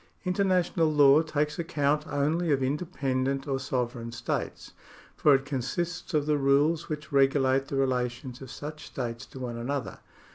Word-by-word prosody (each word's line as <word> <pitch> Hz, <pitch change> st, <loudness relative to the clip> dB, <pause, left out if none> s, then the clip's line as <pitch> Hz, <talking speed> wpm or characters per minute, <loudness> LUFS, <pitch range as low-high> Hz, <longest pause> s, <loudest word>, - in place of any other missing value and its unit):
International 180 Hz, -4 st, +2 dB
law 145 Hz, 0 st, +6 dB
takes 150 Hz, 0 st, -1 dB
account 150 Hz, -3 st, 0 dB
only 155 Hz, +4 st, 0 dB
of 135 Hz, -2 st, +2 dB
independent 135 Hz, -2 st, -1 dB
or 135 Hz, -1 st, -1 dB
sovereign 125 Hz, -3 st, -3 dB
states, 120 Hz, 0 st, -4 dB, 0.4 s
for 145 Hz, -2 st, +5 dB
it 135 Hz, 0 st, -1 dB
consists 155 Hz, +6 st, -3 dB
of 150 Hz, -1 st, +2 dB
the 150 Hz, -1 st, +1 dB
rules 145 Hz, +4 st, +2 dB
which 155 Hz, 0 st, -5 dB
regulate 135 Hz, -1 st, +3 dB
the 140 Hz, -, -4 dB
relations 125 Hz, -1 st, -1 dB
of 130 Hz, -, -9 dB
such 150 Hz, +4 st, -8 dB
states 120 Hz, -2 st, -5 dB
to -, -, -12 dB
one 125 Hz, -2 st, -5 dB
another. 130 Hz, +2 st, -3 dB
140 Hz, 150 wpm, -28 LUFS, 130-155 Hz, 0.4 s, law